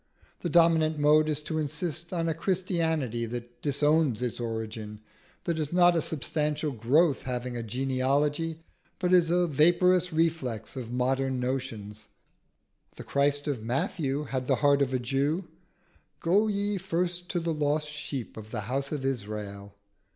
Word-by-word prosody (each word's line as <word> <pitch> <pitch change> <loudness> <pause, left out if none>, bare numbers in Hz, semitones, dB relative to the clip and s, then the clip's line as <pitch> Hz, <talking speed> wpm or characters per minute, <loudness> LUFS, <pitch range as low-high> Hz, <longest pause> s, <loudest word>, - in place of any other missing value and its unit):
The 175 - -3
dominant 160 -1 +4
mode 150 +1 +4
is 150 0 -1
to 155 +1 -2
insist 160 +2 -3
on 165 -2 -1
a 165 - +1
Christianity 160 - -1
that 120 +1 -7
disowns 145 -3 +2
its 125 -1 -3
origin, 110 -2 -5 0.4
that 170 -2 -1
is 150 -2 -2
not 175 0 +5
a 165 - +2
substantial 150 0 -1
growth 135 +6 +3
having 125 -1 -4
a 120 - -3
genealogy, 135 +7 0 0.3
but 180 -1 +1
is 175 -2 +5
a 175 +1 +3
vaporous 175 +4 +3
reflex 160 -8 -1
of 120 -3 -6
modern 130 +1 0
notions. 115 -5 -4 0.9
The - - -8
Christ 145 +1 +1
of 140 -6 -1
Matthew 135 +4 -1
had 130 -3 -3
the - - +3
heart 140 0 +5
of 135 -2 +2
a 130 - +1
Jew 140 +8 -1 0.7
"Go 200 +6 +3
ye 205 -1 -1
first 175 0 -2
to 175 - 0
the 165 -1 -1
lost 150 0 0
sheep 145 -6 -6
of 110 -1 -9
the 110 -2 -3
house 135 +6 -3
of 145 -3 -3
Israel." 100 -5 -4
145 Hz, 155 wpm, -28 LUFS, 125-165 Hz, 0.9 s, not